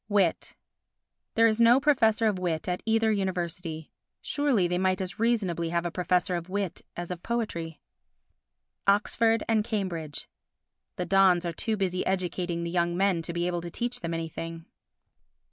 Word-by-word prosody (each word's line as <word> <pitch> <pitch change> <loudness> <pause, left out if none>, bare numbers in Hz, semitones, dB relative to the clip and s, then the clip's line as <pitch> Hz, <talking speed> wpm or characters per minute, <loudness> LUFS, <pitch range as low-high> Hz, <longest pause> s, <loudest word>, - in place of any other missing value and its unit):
Wit 195 -5 +1 0.8
There 230 - +5
is 225 0 +3
no 235 +3 +7
Professor 230 -6 +3
of 210 -4 +1
Wit 170 -3 -2
at 180 0 -1
either 225 0 +3
University. 175 -5 -3 0.3
Surely 270 -11 +1
they 180 0 -1
might 185 0 +1
as 185 +1 -5
reasonably 195 -8 +1
have 170 0 -1
a 175 - -2
professor 180 0 +1
of 170 +1 -5
wit 195 -2 -2 0.2
as 175 +1 -5
of 175 -1 -5
poetry. 170 -9 -3 1.1
Oxford 225 +2 +3
and 220 -2 +2
Cambridge 180 -9 -4 0.7
The 180 - -3
dons 185 -1 +4
are 170 - -2
too 220 +6 -1
busy 185 -2 0
educating 180 -2 -1
the 170 - -3
young 175 0 +1
men 190 -3 +2
to 165 - -4
be 170 0 -1
able 175 -1 -1
to 170 - -6
teach 240 +7 -3
them 170 -1 -3
anything. 165 0 -5
180 Hz, 160 wpm, -28 LUFS, 170-215 Hz, 1.1 s, no